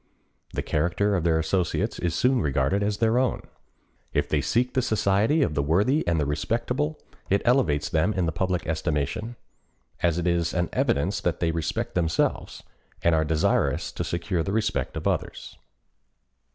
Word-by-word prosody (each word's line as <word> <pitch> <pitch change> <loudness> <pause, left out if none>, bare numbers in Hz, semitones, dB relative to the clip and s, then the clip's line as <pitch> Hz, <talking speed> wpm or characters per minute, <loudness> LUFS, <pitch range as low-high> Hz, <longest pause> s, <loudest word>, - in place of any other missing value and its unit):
The - - -2
character 90 +6 +1
of 90 - 0
their 80 -1 +3
associates 85 +2 -1
is 85 -2 -1
soon 125 +8 +2
regarded 70 +5 +1
as 105 0 0
their 115 +2 +2
own. 130 -2 0 0.7
If - - +1
they - - +1
seek 125 +2 0
the 130 - +2
society 110 +6 +2
of 80 - -1
the 70 - +1
worthy 100 - +2
and 85 -2 +2
the 75 - +1
respectable, 120 - -1 0.3
it 100 - +2
elevates 120 - +2
them 80 +6 +1
in 95 -4 0
the 80 - 0
public 90 0 -1
estimation, 80 - -2 0.7
as 85 -1 +2
it 90 - -2
is 85 -1 0
an 85 -1 0
evidence 95 +8 0
that 90 -4 -1
they 85 -1 +1
respect 80 -1 -2
themselves, 85 -2 -1 0.4
and 85 - +4
are 80 -1 +3
desirous 80 0 +1
to - - -4
secure 85 +1 -2
the 80 - -2
respect 105 -1 -1
of - - -2
others. - - -3
90 Hz, 170 wpm, -25 LUFS, 80-105 Hz, 0.7 s, and